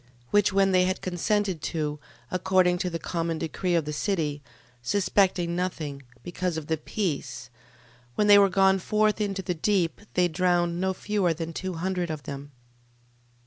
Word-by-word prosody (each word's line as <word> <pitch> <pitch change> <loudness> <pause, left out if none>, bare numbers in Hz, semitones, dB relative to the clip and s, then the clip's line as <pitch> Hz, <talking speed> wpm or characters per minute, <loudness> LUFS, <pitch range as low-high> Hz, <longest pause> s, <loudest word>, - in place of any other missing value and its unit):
12:4. 125 - -31 0.2
Which 205 0 +4
when 195 0 +3
they 185 -1 +4
had 185 0 -1
consented 190 -1 -1
to, 150 -2 -3 0.3
according 185 -1 +2
to 180 - -1
the 165 - -3
common 165 -1 -2
decree 170 +3 -1
of 165 -3 +1
the 150 - -4
city, 150 -4 -1 0.4
suspecting 185 +2 +1
nothing, 160 -6 -3 0.2
because 175 -1 -3
of 160 - -5
the 160 +1 -1
peace: 140 - -4 0.6
when 210 - +2
they 205 -1 +8
were 200 -1 +5
gone 190 0 +4
forth 215 +3 +1
into 195 -2 -2
the 180 - -1
deep, 175 -1 0
they 180 -1 +4
drowned 175 0 +1
no 190 0 0
fewer 195 -6 0
than 165 +1 -5
two 185 +2 -4
hundred 180 +1 -2
of 155 -3 -5
them. 140 +2 -7
180 Hz, 170 wpm, -26 LUFS, 160-190 Hz, 0.6 s, they